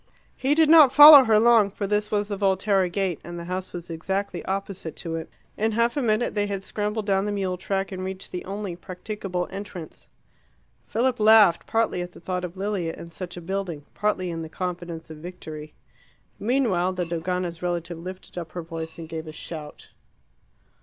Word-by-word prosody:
He 275 Hz, +3 st, +1 dB
did 320 Hz, 0 st, +5 dB
not 310 Hz, -4 st, +8 dB
follow 290 Hz, -2 st, +11 dB
her 220 Hz, -2 st, +5 dB
long, 225 Hz, -3 st, +5 dB
for 200 Hz, +1 st, -4 dB
this 210 Hz, +1 st, 0 dB
was 205 Hz, -1 st, 0 dB
the 205 Hz, -, -2 dB
Volterra 195 Hz, -1 st, +2 dB
gate, 185 Hz, -2 st, -2 dB
and 175 Hz, +1 st, -7 dB
the 170 Hz, -, -6 dB
house 185 Hz, +1 st, -4 dB
was 175 Hz, -1 st, -7 dB
exactly 190 Hz, +3 st, -3 dB
opposite 190 Hz, -3 st, -4 dB
to 165 Hz, -, -6 dB
it. 160 Hz, -, -5 dB, 0.3 s
In 220 Hz, +1 st, 0 dB
half 235 Hz, +2 st, +1 dB
a 285 Hz, -, 0 dB
minute 225 Hz, 0 st, +1 dB
they 205 Hz, -1 st, 0 dB
had 195 Hz, -1 st, -4 dB
scrambled 210 Hz, +1 st, -3 dB
down 195 Hz, 0 st, +1 dB
the -, -, -1 dB
mule 190 Hz, -3 st, -1 dB
track 195 Hz, +2 st, -2 dB
and 185 Hz, -1 st, -5 dB
reached 190 Hz, 0 st, -6 dB
the 180 Hz, -, -5 dB
only 195 Hz, -2 st, -5 dB
practicable 180 Hz, 0 st, -5 dB
entrance. 195 Hz, -4 st, -8 dB, 0.8 s
Philip 245 Hz, +1 st, 0 dB
laughed, 215 Hz, -4 st, +6 dB
partly 225 Hz, -5 st, 0 dB
at 175 Hz, 0 st, -7 dB
the -, -, -13 dB
thought 180 Hz, +1 st, -3 dB
of 180 Hz, +1 st, -6 dB
Lilia 190 Hz, -4 st, -2 dB
in 170 Hz, -, -10 dB
such 180 Hz, +1 st, -7 dB
a -, -, -6 dB
building, 175 Hz, -4 st, -4 dB
partly 195 Hz, -4 st, -1 dB
in 165 Hz, -1 st, -4 dB
the 160 Hz, -, -7 dB
confidence 175 Hz, -2 st, -5 dB
of 155 Hz, -, -9 dB
victory. 155 Hz, -2 st, -9 dB, 0.6 s
Meanwhile 210 Hz, -7 st, +1 dB
the 180 Hz, -1 st, -2 dB
Dogana's 170 Hz, +1 st, -3 dB
relative 175 Hz, -1 st, -3 dB
lifted 185 Hz, +1 st, -8 dB
up 165 Hz, -2 st, -8 dB
her 175 Hz, -, -5 dB
voice 165 Hz, -1 st, -6 dB
and 165 Hz, -1 st, -7 dB
gave 160 Hz, 0 st, -6 dB
a -, -, -6 dB
shout. 155 Hz, -1 st, -9 dB
185 Hz, 195 wpm, -25 LUFS, 170-210 Hz, 0.8 s, follow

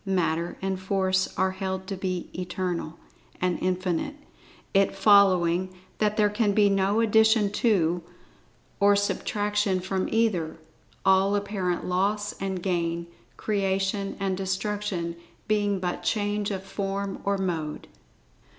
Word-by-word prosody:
Matter 170 Hz, -4 st, 0 dB
and 190 Hz, -1 st, -1 dB
Force 190 Hz, 0 st, +1 dB
are 190 Hz, 0 st, +2 dB
held 190 Hz, 0 st, -4 dB
to 195 Hz, -, -4 dB
be 185 Hz, -2 st, -3 dB
Eternal, 175 Hz, -2 st, -3 dB, 0.4 s
and 180 Hz, -1 st, 0 dB
Infinite, 185 Hz, -, -1 dB, 0.6 s
it 195 Hz, -1 st, +3 dB
following 185 Hz, -3 st, +4 dB, 0.2 s
that 210 Hz, 0 st, +1 dB
there 210 Hz, -1 st, +5 dB
can 210 Hz, 0 st, +1 dB
be[Pg 205 Hz, 0 st, +4 dB
22] -, -, +2 dB
no 195 Hz, +3 st, +2 dB
addition 220 Hz, -1 st, +4 dB
to, 180 Hz, -6 st, +2 dB, 0.8 s
or 200 Hz, 0 st, +5 dB
subtraction 205 Hz, -1 st, 0 dB
from 190 Hz, +1 st, -2 dB
either; 210 Hz, -8 st, 0 dB, 0.5 s
all 195 Hz, +1 st, +4 dB
apparent 195 Hz, -3 st, -1 dB
loss 205 Hz, +3 st, 0 dB
and 190 Hz, -2 st, -3 dB
gain, 170 Hz, -2 st, -1 dB, 0.3 s
creation 195 Hz, -1 st, -1 dB
and 195 Hz, -1 st, 0 dB
destruction 190 Hz, -2 st, -2 dB, 0.3 s
being 205 Hz, -2 st, +1 dB
but 180 Hz, -1 st, -3 dB
change 205 Hz, -1 st, 0 dB
of 190 Hz, -2 st, -4 dB
form 195 Hz, 0 st, -3 dB
or 200 Hz, 0 st, +1 dB
mode. 165 Hz, -5 st, -3 dB
195 Hz, 125 wpm, -26 LUFS, 185-205 Hz, 0.8 s, there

